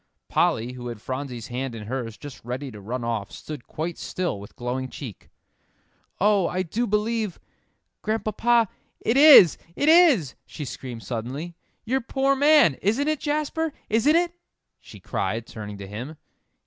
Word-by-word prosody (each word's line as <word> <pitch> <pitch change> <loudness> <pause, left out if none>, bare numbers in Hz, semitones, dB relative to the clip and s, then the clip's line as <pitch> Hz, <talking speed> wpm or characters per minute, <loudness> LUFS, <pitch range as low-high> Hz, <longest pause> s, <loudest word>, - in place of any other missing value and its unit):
Polly, 115 +3 +1
who 125 -1 -7
had 120 -3 -6
Phronsie's 130 -1 -5
hand 125 0 -4
in 110 -2 -7
hers, 115 -2 -4
just 145 -4 -10
ready 130 +3 -5
to 105 -2 -11
run 120 +5 -4
off, 115 -4 -2
stood 150 -6 -8
quite 165 +2 -4
still 175 - -3
with 100 - -12
glowing 130 +2 -3
cheek. 125 -9 -9 0.9
"Oh, 200 -2 +3
I 185 +1 -1
do 225 +8 -2
believe 215 -1 -1 0.6
Grandpapa 225 +2 +2 0.3
it 225 - 0
is 275 - +9 0.2
it 285 - 0
is!" 305 - +6
she 150 - -7
screamed 120 -2 -7
suddenly 130 +8 -5 0.3
"your 260 +4 0
poor 270 +2 +1
man! 285 - +5
Isn't 240 +10 +1
it, 310 -2 0
Jasper 305 +1 -1 0.2
isn't 230 +9 +3
it?" 345 0 +2 0.5
she - - -13
cried, 115 +1 -2
turning 105 -3 -8
to 100 - -8
him. 120 +10 -7
155 Hz, 155 wpm, -25 LUFS, -, 0.9 s, is